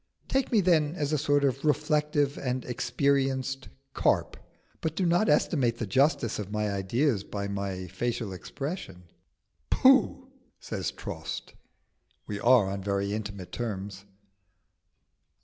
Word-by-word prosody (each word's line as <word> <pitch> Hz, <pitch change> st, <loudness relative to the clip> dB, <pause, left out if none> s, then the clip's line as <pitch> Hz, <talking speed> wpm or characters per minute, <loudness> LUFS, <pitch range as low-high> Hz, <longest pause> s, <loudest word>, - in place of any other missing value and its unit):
Take 265 Hz, -1 st, 0 dB
me 220 Hz, -4 st, +4 dB
then 165 Hz, -4 st, +3 dB
as 150 Hz, -2 st, -1 dB
a -, -, +3 dB
sort 145 Hz, 0 st, +2 dB
of 135 Hz, -1 st, 0 dB
reflective 150 Hz, -1 st, +1 dB
and 130 Hz, -1 st, -3 dB
experienced 135 Hz, +1 st, 0 dB, 0.2 s
carp; -, -, +1 dB, 0.5 s
but 160 Hz, -1 st, -2 dB
do 185 Hz, -, 0 dB
not 175 Hz, +5 st, +3 dB
estimate 135 Hz, -5 st, +2 dB
the 115 Hz, -, -2 dB
justice 130 Hz, -, +2 dB
of 105 Hz, -1 st, -5 dB
my 105 Hz, -1 st, -1 dB
ideas 100 Hz, +4 st, 0 dB
by 100 Hz, -1 st, -4 dB
my 100 Hz, -2 st, -3 dB
facial 115 Hz, +2 st, -3 dB
expression." 115 Hz, -, -6 dB, 0.7 s
"Pooh!" 265 Hz, 0 st, +4 dB, 0.3 s
says 95 Hz, -4 st, -3 dB
Trost. -, -, -6 dB, 0.7 s
(We 100 Hz, -1 st, -4 dB
are 120 Hz, -3 st, +5 dB
on 100 Hz, 0 st, -3 dB
very 100 Hz, +1 st, -1 dB
intimate 100 Hz, -4 st, -5 dB
terms.) 100 Hz, -4 st, -5 dB
125 Hz, 130 wpm, -28 LUFS, 100-150 Hz, 0.7 s, are